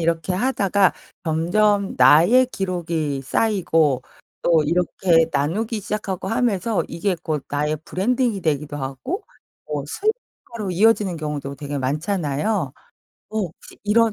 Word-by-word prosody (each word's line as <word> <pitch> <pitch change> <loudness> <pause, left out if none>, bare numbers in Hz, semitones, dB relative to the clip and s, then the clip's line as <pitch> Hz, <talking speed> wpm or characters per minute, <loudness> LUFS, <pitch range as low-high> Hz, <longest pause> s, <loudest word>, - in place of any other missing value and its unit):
이렇게 165 +2 0
하다가 200 -3 +2 0.3
점점 195 +6 +2
나의 165 - +6
기록이 170 - -2
쌓이고 165 - +1 0.4
또 165 -2 +4
이렇게 170 +1 +2
나누기 210 +10 -1
시작하고 195 -2 -3
하면서 225 -3 +1
이게 190 +2 -1
곧 155 -5 -2
나의 150 +2 0
브랜딩이 235 +3 0
되기도 150 -3 -1
하고 135 - -4 0.4
뭐 145 -2 -3
수익화로 240 - -4
이어지는 205 -2 +3
경우도 150 -3 -4
되게 145 0 -5
많잖아요? 150 +3 -1 0.6
어 220 - -6
혹시 180 -6 -6
이런 225 +1 +3
180 Hz, 285 characters per minute, -22 LUFS, 150-210 Hz, 0.6 s, 나의